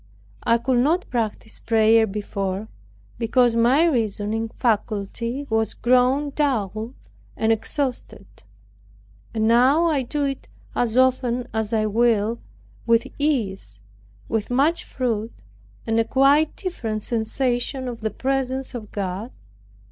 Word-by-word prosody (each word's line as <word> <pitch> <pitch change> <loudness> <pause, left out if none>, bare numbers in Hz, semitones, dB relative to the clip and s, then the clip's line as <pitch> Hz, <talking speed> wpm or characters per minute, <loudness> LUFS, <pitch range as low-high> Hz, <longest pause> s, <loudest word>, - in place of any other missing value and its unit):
I 230 - +3
could 250 +1 +1
not 325 +8 +1
practice 225 -2 -3
prayer 225 0 +4
before, 200 0 -3 0.5
because 240 0 +3
my 250 +8 +4
reasoning 225 -5 -1
faculty 230 +4 -2
was 220 -1 0
grown 255 +4 +2
dull 230 -5 -1 0.4
and 220 0 +2
exhausted; 250 -1 -3 1.1
but 220 - -1
now 255 +8 +4
I 305 -5 +2
do 285 +4 -2
it 275 -1 -3 0.3
as 240 0 0
often 250 -1 +2
as 220 -1 -2
I 220 -1 +1
will, 225 0 +2 0.5
with 230 0 +4
ease, 195 - -1 0.5
with 220 -2 -2
much 280 +7 +2
fruit, 230 -3 -2 0.5
and 225 0 +1
a - - +4
quite 275 +6 +3
different 225 - -4
sensation 245 +3 -1
of 235 -2 -6
the 220 - -1
presence 265 +3 -2
of 220 -4 -7
God." 200 +4 -4
235 Hz, 120 wpm, -23 LUFS, 220-265 Hz, 1.1 s, prayer